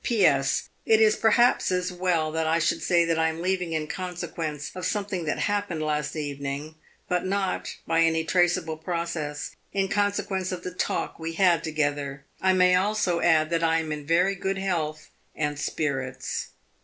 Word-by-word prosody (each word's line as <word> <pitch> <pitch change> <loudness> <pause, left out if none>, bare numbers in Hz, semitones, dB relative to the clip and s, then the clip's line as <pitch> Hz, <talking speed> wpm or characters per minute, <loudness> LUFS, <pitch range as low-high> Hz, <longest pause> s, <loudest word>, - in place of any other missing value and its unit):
"P.S. 150 - +2
It 220 -1 +4
is 215 -1 +5
perhaps 235 +1 +3
as 180 0 0
well 175 -3 0
that 160 0 -1
I 160 +1 +3
should 170 0 +1
say 170 -1 +3
that 165 -1 +1
I 160 0 +3
am 160 0 -5
leaving 180 -1 -1
in 155 -1 -1
consequence 165 -4 -4
of 185 - -7
something 195 -2 -2
that 155 - -1
happened 205 -6 -1
last 150 0 -1
evening, 145 0 -4 0.3
but 180 -1 0
not 195 0 -1
by 165 0 +2
any 165 0 +3
traceable 175 -1 +1
process 160 -3 -4 0.2
in 195 -1 0
consequence 200 -2 0
of 180 -1 -5
the 180 - -5
talk 180 - -2
we 165 0 -4
had 175 -2 +3
together. 145 -3 -2 0.2
I 190 - +4
may 180 0 +5
also 185 -2 +2
add 160 -2 +3
that 165 0 +1
I 165 0 +3
am 160 -1 -2
in 150 -1 -4
very 180 +4 +3
good 195 0 -2
health 165 -5 -2 0.2
and 145 -1 -2
spirits." 135 -4 -2
165 Hz, 175 wpm, -26 LUFS, 155-185 Hz, 0.3 s, is